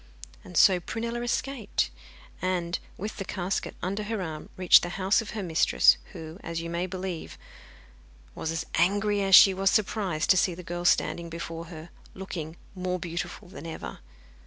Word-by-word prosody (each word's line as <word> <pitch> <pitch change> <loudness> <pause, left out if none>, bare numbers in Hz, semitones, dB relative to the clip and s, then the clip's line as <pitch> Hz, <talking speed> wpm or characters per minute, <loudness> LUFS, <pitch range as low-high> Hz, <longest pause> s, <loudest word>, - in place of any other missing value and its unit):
And 180 -2 -7
so 185 -2 +6
Prunella 230 +6 -4
escaped, 240 - -1 0.5
and, 180 -1 -1 0.2
with 210 +3 -5
the 195 - -3
casket 185 0 -3
under 195 +4 -1
her 215 +1 -3
arm, 160 -4 -5
reached 185 -1 +7
the 175 - -3
house 195 +3 +3
of 225 - -8
her 205 - -2
mistress, 165 -2 +4 0.2
who, 160 0 -8
as 165 0 -4
you 170 0 -5
may 175 +2 -1
believe, 185 -2 -5 1.0
was 160 - -4
as 165 -1 -2
angry 205 +4 +2
as 195 -1 +6
she 195 - +9
was 195 +1 +2
surprised 195 -6 +1
to 185 - +5
see 180 -1 +2
the 180 - -9
girl 175 +1 -5
standing 170 -1 +2
before 165 0 -6
her, 165 0 -10 0.2
looking 170 -4 -6 0.2
more 185 -1 -2
beautiful 175 +2 -5
than 175 -2 -9
ever. 160 - -7
180 Hz, 170 wpm, -27 LUFS, 170-195 Hz, 1.0 s, she